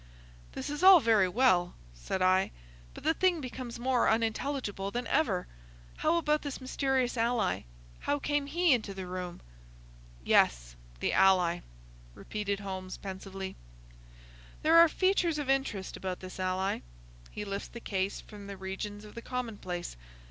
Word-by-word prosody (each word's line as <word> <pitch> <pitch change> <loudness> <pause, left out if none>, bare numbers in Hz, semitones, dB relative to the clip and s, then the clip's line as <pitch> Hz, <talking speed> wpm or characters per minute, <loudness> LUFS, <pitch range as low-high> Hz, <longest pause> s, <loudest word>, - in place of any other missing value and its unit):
"This - - -4
is 295 - -4
all 375 -1 +10
very 220 -7 +4
well," 180 -5 +3 0.2
said - - -3
I, 185 +1 +4 0.5
"but - - -10
the 320 - +3
thing 360 0 +2
becomes 255 -3 -6
more 250 +1 +2
unintelligible 225 -2 -1
than 240 +3 -3
ever. 225 - +1 0.5
How 340 - +2
about 305 -2 +1
this 285 -2 -5
mysterious 260 -1 0
ally? 230 - +1 0.3
How 290 - 0
came 290 0 -1
he 340 +1 +3
into 215 -5 -1
the 190 -1 -5
room?" 180 -1 -6 0.8
"Yes, - - +3 0.3
the - - +1
ally!" 180 -3 +4 0.6
repeated 205 -1 -3
Holmes, 185 -1 -5
pensively. 190 0 -6 1.1
"There 320 +2 +6
are 335 -1 +8
features 365 -3 +2
of 285 -3 0
interest 250 -8 -1
about 185 -1 -4
this 185 0 -9
ally. 185 +1 0 0.5
He 210 - -6
lifts 200 0 -4
the 235 - -9
case 195 -3 -2
from 205 -2 -11
the 200 -1 -7
regions 205 +2 -5
of 210 - -12
the 235 - -7
commonplace. 215 -9 -4
210 Hz, 150 wpm, -30 LUFS, 190-270 Hz, 1.1 s, all